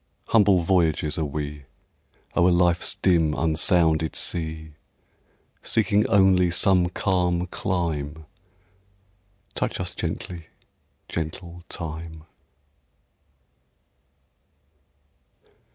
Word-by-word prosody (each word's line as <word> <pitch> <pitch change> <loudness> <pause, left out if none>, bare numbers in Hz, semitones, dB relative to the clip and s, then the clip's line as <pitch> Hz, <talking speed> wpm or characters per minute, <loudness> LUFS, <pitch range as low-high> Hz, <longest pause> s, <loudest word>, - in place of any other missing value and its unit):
Humble 100 -5 +4
voyagers 80 -3 +1
are 80 - 0
we, 75 0 -5 0.7
O'er 85 +1 +4
life's 85 -1 +2
dim 80 -5 +3
unsounded 80 -1 +1
sea, 80 -2 -3 0.9
Seeking 105 -1 +1
only 95 -2 +4
some 90 0 +3
calm 90 -2 0
clime; 80 -4 -3 1.3
Touch - - -2
us - - -4
gently, 85 -3 -5 0.6
gentle 85 +2 -6
Time! 80 -2 -7
85 Hz, 70 wpm, -24 LUFS, 80-90 Hz, 1.3 s, Humble